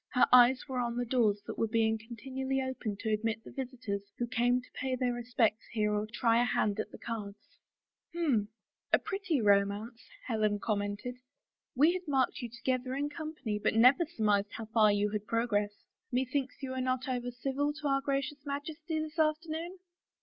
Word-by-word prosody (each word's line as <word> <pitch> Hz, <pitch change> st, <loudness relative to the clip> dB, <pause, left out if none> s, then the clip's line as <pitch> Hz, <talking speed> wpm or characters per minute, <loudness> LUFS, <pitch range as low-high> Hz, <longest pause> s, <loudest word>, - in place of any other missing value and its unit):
Her 250 Hz, -, +6 dB
eyes 250 Hz, +2 st, +7 dB
were 260 Hz, -2 st, -2 dB
on 240 Hz, -1 st, -1 dB
the 245 Hz, -, 0 dB
doors 220 Hz, -4 st, +2 dB
that -, -, -6 dB
were 225 Hz, -, +2 dB
being 220 Hz, 0 st, +2 dB
continually 265 Hz, +4 st, -3 dB
opened 255 Hz, -6 st, -3 dB
to 220 Hz, -2 st, 0 dB
admit 220 Hz, +1 st, -1 dB
the -, -, -11 dB
visitors 255 Hz, -6 st, -4 dB, 0.2 s
who 240 Hz, -, 0 dB
came 245 Hz, +1 st, +2 dB
to 250 Hz, -, -15 dB
pay 265 Hz, -2 st, -2 dB
their 250 Hz, -1 st, 0 dB
respects 235 Hz, -2 st, 0 dB
here 210 Hz, -2 st, +1 dB
or 210 Hz, +1 st, -1 dB
try 230 Hz, 0 st, +3 dB
a -, -, +4 dB
hand 215 Hz, -3 st, +1 dB
at -, -, -2 dB
the -, -, -11 dB
cards. 210 Hz, -4 st, -7 dB, 0.2 s
" -, -, -62 dB
H'm 270 Hz, -12 st, +1 dB, 0.2 s
— -, -, -55 dB
a -, -, +7 dB
pretty 375 Hz, -, -1 dB
romance," 205 Hz, +3 st, +2 dB, 0.2 s
Helen 215 Hz, -4 st, +1 dB
commented. 205 Hz, +3 st, -2 dB, 0.3 s
" -, -, -61 dB
We 300 Hz, +7 st, +5 dB
had 365 Hz, -2 st, -5 dB
marked 270 Hz, -3 st, +1 dB
you 240 Hz, -, -4 dB
together 255 Hz, +2 st, -2 dB
in 290 Hz, +1 st, -1 dB
company 295 Hz, -9 st, -4 dB
but 210 Hz, -, +1 dB
never 250 Hz, +9 st, +6 dB
surmised 210 Hz, -8 st, +1 dB
how 225 Hz, -, -5 dB
far 220 Hz, -1 st, +4 dB
you 205 Hz, 0 st, +1 dB
had 210 Hz, -1 st, -3 dB
progressed.... 210 Hz, -3 st, 0 dB, 0.3 s
Methinks 260 Hz, +2 st, -1 dB
you 260 Hz, -, -3 dB
were 260 Hz, 0 st, -2 dB
not 255 Hz, 0 st, -1 dB
over 245 Hz, -1 st, -2 dB
civil 270 Hz, +4 st, -1 dB
to 300 Hz, 0 st, -4 dB
our 275 Hz, 0 st, +2 dB
Gracious 275 Hz, +1 st, -2 dB
Majesty 305 Hz, +3 st, -4 dB
this 310 Hz, +1 st, -5 dB
afternoon? 320 Hz, +3 st, 0 dB
245 Hz, 195 wpm, -31 LUFS, 220-275 Hz, 0.3 s, eyes